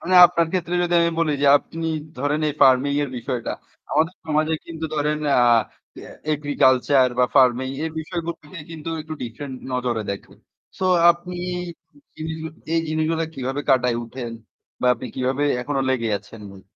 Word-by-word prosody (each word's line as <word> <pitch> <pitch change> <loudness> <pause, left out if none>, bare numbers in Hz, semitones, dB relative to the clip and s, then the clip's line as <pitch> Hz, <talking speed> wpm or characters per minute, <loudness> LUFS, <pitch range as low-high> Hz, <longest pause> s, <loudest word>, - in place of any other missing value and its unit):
মানে 185 +1 -1
আপনার 170 -1 +1
ক্ষেত্রে 175 -1 -1
যদি 175 0 0
আমি 170 0 +3
বলি 165 -3 +2
যে - - +4
আপনি 165 +2 -6 0.3
ধরেন 145 +3 0
এই 145 - -3
ফার্মিং 135 +2 +5
এর 140 - -3
বিষয়টা। 120 0 -3 0.4
আমাদের 160 +4 +1
সমাজে 155 +1 +1
কিন্তু 160 -1 -6
ধরেন 150 0 0 0.2
আ - - +5 0.9
এগ্রিকালচার 135 -2 +3
বা 125 - +6
ফার্মিং 130 -1 +4 0.2
এর 160 - -2
বিষয়গুলোকে 165 -1 -5 0.2
কিন্তু 160 0 -7
একটু 155 0 -7
ডিফারেন্ট 130 +3 -6 0.2
নজরে 125 -3 -1
দেখে। 100 - -7 0.5
সো 190 - -2 0.3
আপনি 175 +1 -4 0.8
জিনিসগুলা 160 0 -5 0.2
এই 165 - +3
জিনিসগুলো 160 +1 0
কিভাবে 135 +2 -3
কাটায় 125 -2 +3
উঠেন 120 0 -7 0.5
বা - - +1
আপনি 120 - -7
কিভাবে 130 +2 -1 0.2
এখনো 135 +1 -2
লেগে 115 -3 0
আছেন 115 +1 -14
ভাই। 95 -1 -14
145 Hz, 155 wpm, -22 LUFS, 130-160 Hz, 0.9 s, বা